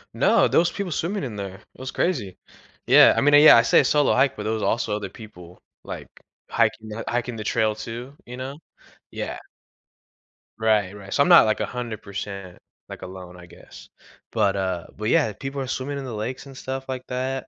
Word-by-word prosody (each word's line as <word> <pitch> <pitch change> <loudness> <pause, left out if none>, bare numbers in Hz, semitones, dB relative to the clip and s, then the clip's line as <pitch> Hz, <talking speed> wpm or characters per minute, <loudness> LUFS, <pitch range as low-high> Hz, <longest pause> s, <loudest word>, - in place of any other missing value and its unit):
No, - - +4
those 170 +1 +3
people 195 -5 -4
swimming 175 +3 -2
in 115 -5 -6
there. 100 -2 -6
It - - -23
was 130 0 -6
crazy. 120 - -2 0.5
Yeah, - - +8
I - - +4
mean, 145 +1 +3
yeah, 145 -2 +9
I 115 - +5
say - - +5
a - - -2
solo 145 -2 +3
hike, 135 +1 +2
but 105 - -5
there 110 +1 -1
was 110 - -3
also 110 -2 0
other 105 -2 -5
people, 90 -4 -13 0.2
like, - - -8 0.4
hiking 110 - 0
tha 110 +2 -6
hiking 120 0 -2
the 110 - -5
trail 110 0 +1
too, 115 +5 -8
you 125 +1 -9
know, 135 +2 -6 0.6
yeah. - - -5 1.2
Right, 105 -3 +1
right, 100 -1 -9
so, - - +2
I'm - - +4
not, 170 -7 +9
like, 110 - 0
100%, 120 -4 -4 0.9
like, - - -10
alone 90 -1 -9
I 90 - -12
guess, 85 - -15 0.4
but, 100 - +1
uh 95 -3 -2
but 110 +2 -3
yeah, 145 -9 +2
people 135 +6 -6
are 135 - -3
swimming 135 +2 -3
in 140 - -5
the 125 - -6
lakes 120 +6 -5
and 135 -1 -12
stuff 130 +1 -5
like 130 -1 -5
that. 130 +1 -3
120 Hz, 205 wpm, -23 LUFS, 105-135 Hz, 1.2 s, yeah